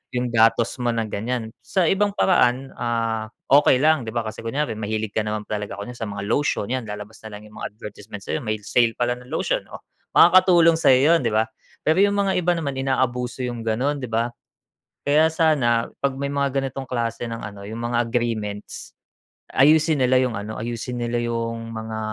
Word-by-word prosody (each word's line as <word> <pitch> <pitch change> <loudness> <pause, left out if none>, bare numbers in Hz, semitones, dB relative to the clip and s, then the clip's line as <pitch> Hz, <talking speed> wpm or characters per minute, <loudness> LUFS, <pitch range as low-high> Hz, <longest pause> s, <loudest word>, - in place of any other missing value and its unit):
'yung 125 0 0
datos 115 0 +3
mo 120 -1 +1
ng 115 -1 -2
ganiyan. 115 +2 -3 0.2
Sa 190 - +1
ibang 205 +4 +2
paraan, 135 -9 +2
ah, 115 -2 -1 0.2
okey 140 -1 +6
lang, 155 -4 +4
'di - - -3
ba, 115 - 0
kasi 110 -1 -6
kunyari 145 +6 -1
mahilig 110 0 -3
ka - - +1
naman 105 0 -3
talaga 105 -1 -4
kunyari 120 +4 -7
sa 110 - -3
mga 100 0 -5
lotion 140 -7 0
'yan 130 -3 -2
lalabas 105 +1 -8
na 105 - -9
lang 105 - -14
'yung 105 - -15
mga - - -3
advertisement 105 -1 -9
sa'yo - - -2
may 110 -2 -1
sale 115 +2 +2
pala 120 0 0
ng 125 - -15
lotion, - - -1
oh, - - -10 0.3
makakatulong 175 -2 +6
sa'yo 140 +2 +5
'yun - - +3
'di - - -1
ba? 110 +1 +3 0.4
Pero 160 +4 +3
'yung 200 0 +2
mga 200 -1 +1
iba 175 0 +2
naman 155 -4 -2
inaabuso 130 -1 -1
'yung 120 -2 -4
gano'n 135 +6 0
'di 125 - -5
ba. 115 +2 0 0.8
Kaya 155 +3 +5
sana 135 -8 +2 0.2
pag 140 - +3
may 140 - -1
mga 140 -1 0
ganitong 135 0 -5
klase 120 -2 -2
ng 115 0 -5
ano 100 -1 -8
'yung 110 +2 -6
mga 120 0 +2
agreements, 115 -4 -3 0.6
ayusin 150 +1 +4
nila 130 0 +4
'yung 125 -2 0
ano, 105 +2 -6
ayusin 120 +2 -4
nila 120 0 -1
'yung 115 -1 -3
mga, 110 0 -5
120 Hz, 195 wpm, -23 LUFS, 110-140 Hz, 0.8 s, okey